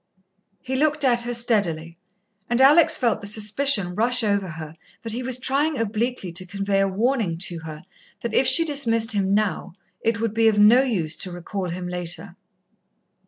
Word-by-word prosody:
He 260 +1 -4
looked 300 +2 0
at 240 -3 +2
her 240 +1 -4
steadily 175 -9 -1 0.5
and 240 +1 0
Alex 305 +4 +6
felt 235 -4 -1
the 200 - -6
suspicion 210 -1 +1
rush 240 +4 +2
over 200 -2 -1
her 155 -1 -9 0.3
that 225 - -6
he 245 - -4
was 255 0 -2
trying 280 +4 0
obliquely 225 -2 -3
to 180 +2 -2
convey 195 +1 -2
a 195 - +2
warning 210 -3 -1
to 175 -1 -2
her 155 -1 -10 0.4
that 235 - -5
if 265 - +2
she 295 +6 +6
dismissed 230 -7 +1
him 200 -2 0
now, 210 -5 -2 0.3
it 225 0 -1
would 225 -2 -2
be 225 0 +2
of 215 -2 +2
no 215 +5 +6
use 190 - -2
to 185 - -2
recall 180 +2 -6
him 180 +1 -6
later. 180 +1 -3
220 Hz, 180 wpm, -22 LUFS, 185-250 Hz, 0.5 s, Alex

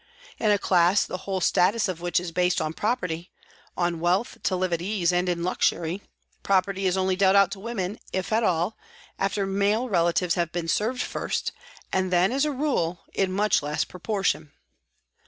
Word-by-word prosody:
In 215 - +2
a 205 - +5
class 180 0 +3
the - - -5
whole 190 -1 -1
status 205 +6 +3
of 180 -3 -4
which 175 0 +1
is 175 -1 -6
based 180 +1 +1
on 155 - -2
property, 180 -6 -2 0.5
on 175 -1 0
wealth 180 +7 0
to 190 - 0
live 185 -1 -1
at 170 - -1
ease 180 -2 0
and 180 +1 +1
in 170 -1 -1
luxury, 175 0 0 0.4
property 195 0 +1
is 185 +1 +1
only 190 0 +1
dealt 190 0 +4
out 200 -2 +5
to 200 - -6
women, 205 -2 -4
if 190 +3 -2
at 225 - +3
all, 180 0 0 0.4
after 195 +1 0
male 200 +5 +1
relatives 170 -2 +2
have 170 -2 -1
been 170 -1 -3
served 225 +8 0
first, - - -2 0.4
and 185 -1 +1
then, 180 +3 +3
as 275 +3 +1
a 300 - 0
rule, 250 - -1
in 190 -1 0
much 210 +3 +2
less 150 +1 -1
proportion. 180 -5 -2
185 Hz, 185 wpm, -25 LUFS, 175-200 Hz, 0.5 s, a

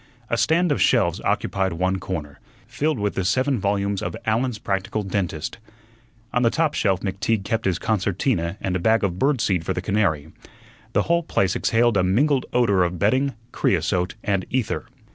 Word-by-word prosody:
A - - +3
stand 165 +6 +2
of 145 - 0
shelves 95 -7 +3
occupied 95 -2 0
one 95 +3 0
corner, 75 -8 -5 0.3
filled 150 -1 -1
with 105 -1 -1
the 95 - -1
seven 130 +6 +1
volumes 100 0 0
of - - -4
"Allen's 115 +2 0
Practical 100 +1 -2
Dentist." 90 -2 -3 0.7
On 125 - +2
the 115 - +4
top 155 +3 +1
shelf 95 -3 +1
McTeague 100 +2 -1
kept 110 +2 -1
his 95 -3 +1
concertina 95 -2 -1
and 95 -1 -1
a - - 0
bag 110 +4 +2
of 90 -2 -1
bird 135 -3 +2
seed 90 -6 +1
for - - -1
the - - -3
canary. 90 -6 0 0.6
The - - +3
whole 170 0 +2
place 100 - 0
exhaled 115 -1 +2
a 90 - +3
mingled 130 +9 +2
odor 105 -7 +3
of 90 0 -2
bedding, 130 +7 +1 0.2
creosote, 90 0 0
and 100 -2 0
ether. 125 -3 -2
100 Hz, 180 wpm, -23 LUFS, 95-120 Hz, 0.7 s, the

